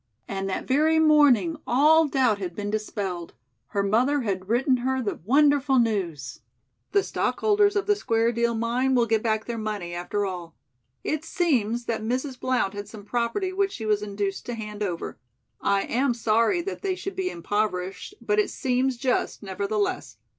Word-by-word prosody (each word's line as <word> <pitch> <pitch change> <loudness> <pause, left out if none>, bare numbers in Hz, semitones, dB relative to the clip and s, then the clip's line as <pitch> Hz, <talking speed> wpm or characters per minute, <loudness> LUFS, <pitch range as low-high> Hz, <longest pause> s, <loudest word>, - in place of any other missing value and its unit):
And 195 0 -3
that 190 - -3
very 310 +4 +3
morning 305 0 +5
all 310 +5 +5
doubt 255 -7 +2
had 180 -3 -5
been 205 0 -3
dispelled. 200 -5 -4 0.3
Her 200 - -1
mother 250 +8 +2
had 190 -4 -3
written 255 +3 +3
her 260 +2 -1
the 225 -5 -3
wonderful 285 +1 +4
news: 195 - -1 0.5
"The 400 -1 +3
stockholders 410 0 +1
of 405 - +1
the 415 - +3
Square 230 - +1
Deal 235 0 0
Mine 245 +4 +1
will 240 -2 +4
get 225 -1 +1
back 220 -1 0
their 235 -1 -4
money, 205 -5 -4
after 190 +4 -2
all. 175 -4 -6 0.5
It 310 0 -2
seems 245 - 0
that 230 -2 -2
Mrs. 255 +3 -2
Blount 255 -7 0
had 205 0 -6
some 210 -2 -11
property 245 - -1
which 395 0 0
she 220 - -6
was 210 -1 +2
induced 200 -1 -3
to 240 - -3
hand 210 -2 -7
over. 180 -5 -3 0.4
I 200 0 +2
am 250 0 0
sorry 230 - +2
that 395 - -5
they 385 -2 -1
should 390 +1 -6
be 370 -1 -1
impoverished, 195 - -3
but 420 0 +1
it 420 - +2
seems 255 -1 0
just, 250 -3 -1
nevertheless. 200 - -2
235 Hz, 175 wpm, -25 LUFS, 205-280 Hz, 0.5 s, morning